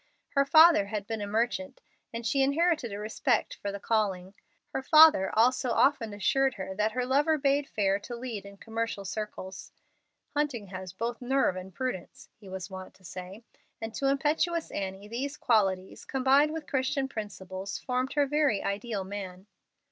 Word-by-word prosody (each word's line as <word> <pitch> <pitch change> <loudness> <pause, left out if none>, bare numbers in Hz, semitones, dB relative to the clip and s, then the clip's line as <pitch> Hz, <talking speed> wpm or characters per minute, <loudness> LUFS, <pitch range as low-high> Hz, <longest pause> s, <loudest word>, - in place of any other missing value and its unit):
Her 275 -1 +2
father 315 -7 +7
had 205 -1 -4
been 225 0 -4
a 205 - -3
merchant, 240 +6 -1 0.3
and 230 0 -6
she 270 +5 +2
inherited 300 -2 +2
a 200 - -4
respect 215 +1 0
for 200 - -2
the 200 - -6
calling. 195 -4 -1 0.4
Her 270 - -3
father 310 -8 +7
also 250 +3 +3
often 235 -3 +2
assured 265 +6 +1
her 190 -1 -5
that 210 +2 0
her 250 +1 -1
lover 290 +5 +3
bade 280 0 +1
fair 195 -1 +1
to 240 +4 -7
lead 235 -4 -5
in 200 0 -12
commercial 225 -2 -4
circles. 195 -1 -6 0.6
"Hunting 285 -9 -1
has 185 -1 -7
both 230 +6 -4
nerve 260 -5 +2
and 185 +1 -7
prudence," 255 +3 -5
he 200 -3 -13
was 190 -1 -5
wont 190 -1 -9
to 190 - -24
say; 185 +5 -9 0.4
and 225 0 -5
to 275 - -1
impetuous 310 +4 +1
Annie 195 +1 -5
these 265 +6 -4
qualities, 195 -5 +1
combined 270 +3 +3
with 320 -1 -5
Christian 270 0 0
principles, 195 -4 -6
formed 255 +1 -2
her 290 -1 +3
very 290 -7 +1
ideal 200 0 -2
man. 190 -1 -7
225 Hz, 170 wpm, -29 LUFS, 195-270 Hz, 0.6 s, father